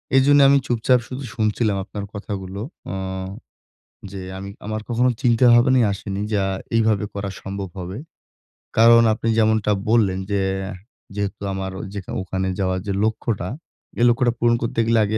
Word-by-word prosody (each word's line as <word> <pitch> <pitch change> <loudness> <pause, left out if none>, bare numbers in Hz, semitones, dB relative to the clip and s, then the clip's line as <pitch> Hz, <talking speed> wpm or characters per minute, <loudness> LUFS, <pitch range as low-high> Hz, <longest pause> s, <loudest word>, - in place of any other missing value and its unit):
এজন্যে 140 +2 +6
আমি 140 - +6
চুপচাপ 125 0 +2
শুধু 130 +2 -6
শুনছিলাম 105 -1 +1
আপনার 100 +1 -6
কথাগুলো। 100 -1 -5 0.3
অ - - -4 1.2
যে 100 -1 -6 0.2
আমি 100 +1 -7 0.2
আমার 110 +1 -3
কখনো 120 +2 +2
চিন্তা 120 0 +4
ভাবনাই 125 +1 +5
আসেনি 100 0 -4
যা 100 -2 +2 0.3
এইভাবে 110 -2 +2
করা 100 0 -4
সম্ভব 95 0 -5
হবে। 90 +2 -6 0.8
কারণ 115 +1 +7
আপনি 110 - -4
যেমনটা 110 -1 +3 0.2
বললেন 105 -5 +3
যে, 100 - +1 0.2
অ্যা 95 +2 -5 0.4
যেহেতু 100 -2 -3
আমার 95 0 -4
ওই - - -5
যেখা 100 -2 -6
ওখানে 95 0 -2
যাওয়ার 95 -1 0
যে 100 - 0
লক্ষ্যটা, 110 -3 -1 0.5
এ - - +1
লক্ষ্যটা 120 0 +2
পূরণ 120 0 +3
করতে 115 0 -2
গেলে, 115 0 +3
আগে 110 +2 -1
105 Hz, 160 wpm, -22 LUFS, 100-115 Hz, 1.2 s, কারণ